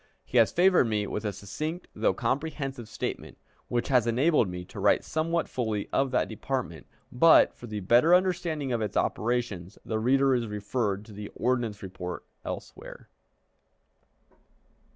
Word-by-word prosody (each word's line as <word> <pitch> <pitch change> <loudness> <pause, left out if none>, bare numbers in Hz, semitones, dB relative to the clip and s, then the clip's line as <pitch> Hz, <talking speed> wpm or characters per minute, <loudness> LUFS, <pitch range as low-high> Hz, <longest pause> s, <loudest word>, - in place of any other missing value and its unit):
He 125 - +2
has 115 - +5
favored 180 -4 +4
me 105 -2 0
with 105 +2 -4
a 105 - 0
succinct 150 - -5
though - - +1
comprehensive 135 -5 -3
statement, - - -5 0.3
which 120 -1 -1
has 125 -4 +3
enabled 125 - +3
me 90 0 -6
to - - -10
write - - +3
somewhat 165 +1 -1
fully 110 -5 -2
of 135 0 +2
that 125 - +1
department; 115 -5 -4 0.2
but, 160 +7 +6
for 120 - -11
the 105 -2 -5
better 120 - +5
understanding 175 -6 0
of 120 -2 0
its 105 - -2
operations, 110 -6 -1
the 110 -1 -2
reader 135 +3 +3
is 120 -2 0
referred 105 0 -2
to 105 - -13
the 105 0 -7
ordnance 120 -5 -1
report 90 -2 -6 0.2
elsewhere. - - -8
120 Hz, 150 wpm, -28 LUFS, 105-140 Hz, 0.3 s, but